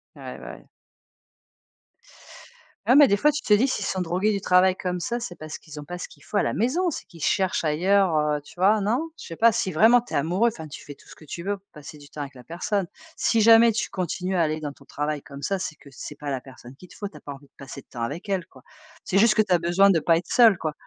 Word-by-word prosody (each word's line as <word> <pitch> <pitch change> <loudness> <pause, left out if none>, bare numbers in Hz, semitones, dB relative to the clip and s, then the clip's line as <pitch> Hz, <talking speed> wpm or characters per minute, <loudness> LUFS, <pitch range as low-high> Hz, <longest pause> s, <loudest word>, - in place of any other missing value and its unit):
Ouais - - -9
bah, - - -8
ouais. - - -20 2.2
Ouais, 250 - +5
mais 290 -2 +7
des 200 - +3
fois, 300 +8 +3
tu 290 - -3
te 210 - +2
dis 230 +6 +4
s'ils 235 -6 -2
sont 190 - -2
drogués 180 +5 0
du 200 - -1
travail 185 0 +4
comme 180 -1 -3
ça, 240 +6 -2
c'est 230 -7 -7
parce 155 -1 -8
qu'ils 155 -2 -13
ont 150 - -6
pas 175 +4 -7
ce - - -6
qu'il - - -19
faut 210 - -3
à - - +3
la - - -1
maison, 310 - 0
c'est 315 - -6
qu'ils 165 -3 -15
cherchent 190 -1 0
ailleurs, 180 +3 +2
heu, 150 -1 0
tu - - -16
vois? 205 +4 +4
Non? 240 +11 -1
Je - - -9
sais 165 - -7
pas, 230 +6 +5
si 190 -4 -2
vraiment 225 +8 +6
tu 245 - -12
es - - 0
amoureux, 180 +11 +2
enfin 160 -7 -9
tu 145 - -10
fais 145 - -9
tout - - -22
ce - - -12
que 155 - -16
tu 170 +4 -7
veux 200 +1 -2
pour 195 - -32
passer 150 0 -11
du 145 -1 -15
temps 150 - -7
avec 140 -1 -7
la 125 -2 -14
personne. 190 - -2 0.3
Si 225 -2 +2
jamais 230 +1 +7
tu 215 - -2
continues 185 +1 -3
à 170 - +3
aller 155 0 -2
dans 145 - -4
ton 140 0 -19
travail 150 +1 -3
comme 140 0 -11
ça, 195 +3 -1
c'est 155 -4 -5
que 140 - -17
c'est 150 - -9
pas 145 0 -7
la 130 - -2
personne 130 -1 -14
qu'il 180 - -14
te - - -17
faut, 205 -3 -5
tu 155 - -14
as - - -12
pas 145 - -8
envie 140 +1 -15
de - - -47
passer 140 0 -9
de - - -33
temps 120 -2 -6
avec 150 - -5
elle, 190 -3 -1
quoi. - - -19 0.4
C'est 195 - -1
juste 215 +1 +5
que 215 - +5
tu 210 - -4
as 175 - +4
besoin 175 +4 +4
de 180 -4 +4
pas 165 +1 +3
être 170 - -5
seul, 230 -6 +6
quoi. 155 -3 -3
180 Hz, 290 wpm, -24 LUFS, 150-210 Hz, 2.2 s, mais